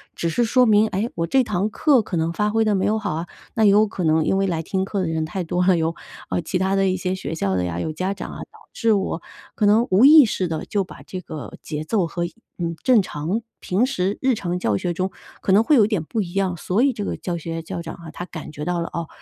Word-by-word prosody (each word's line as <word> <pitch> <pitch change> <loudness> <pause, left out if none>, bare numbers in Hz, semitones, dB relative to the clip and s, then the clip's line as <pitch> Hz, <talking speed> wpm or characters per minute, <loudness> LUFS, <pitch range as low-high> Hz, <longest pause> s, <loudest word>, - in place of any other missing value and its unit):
只 170 - -2
是 205 +9 +1
说 250 +2 +4
明， 215 -1 +5
哎， 205 +2 -1
我 165 0 -2
这 265 +6 +3
堂 205 -2 -1
课 270 +3 +3
可 190 -4 -4
能 165 +1 0
发 210 +3 0
挥 225 +1 +2
得 215 - +2
没 190 - +1
有 215 - +2
好 205 -6 -2
啊， 165 +2 -4 0.3
那 220 - +1
也 210 - +7
有 210 +2 +5
可 200 -3 -5
能 160 -1 +3
因 195 - +2
为 195 0 +1
来 165 -3 -1
听 190 +3 -1
课 200 +1 -3
的 180 - -1
人 160 -1 -1
太 180 +4 -4
多 175 +2 0
了， 185 -2 +5
有， 165 0 0 0.4
呃， - - 0
其 180 - -2
他 190 +1 0
的 195 0 +2
一 185 - 0
些 185 +1 -2
学 165 -4 -4
校 100 -11 -1
的 90 - 0
呀， 85 -1 -3
有 155 - -3
家 185 +5 -2
长 - - -7
啊， - - -9
导 - - -17 0.2
致 230 -2 +2
我 190 -4 -1 0.3
可 210 - +1
能 220 +3 +5
无 190 +5 +5
意 295 0 +9
识 190 -4 -1
地 160 -1 -4
就 200 -2 0
把 - - -12
这 185 - -7
个 155 -5 -8
节 150 -1 -4
奏 180 +2 0
和， 170 +1 -3 0.3
嗯， 170 -1 -2
正 250 -4 +5
常 175 +7 -3 0.2
平 200 +7 +1
时 200 -6 -1
日 265 - +4
常 180 -5 -2
教 110 - 0
学 175 - -2
中， 185 +2 -1 0.3
可 - - +1
能 205 +3 +6
会 300 - +4
有 220 -6 +6
一 - - 0
点 210 -8 -1
不 220 +7 -2
一 175 -3 -6
样， 190 -3 0
所 185 +7 0
以 275 +1 +4
这 210 -4 -5
个 - - -2
教 175 -2 -4
学 165 0 -5
校长 165 0 -6
啊， 170 -1 -11
他 175 - -6
感 160 -4 -8
觉 150 0 -6
到 175 -1 -1
了， 170 - -3
哦， 170 -1 -3
185 Hz, 305 characters per minute, -22 LUFS, 165-210 Hz, 0.4 s, 意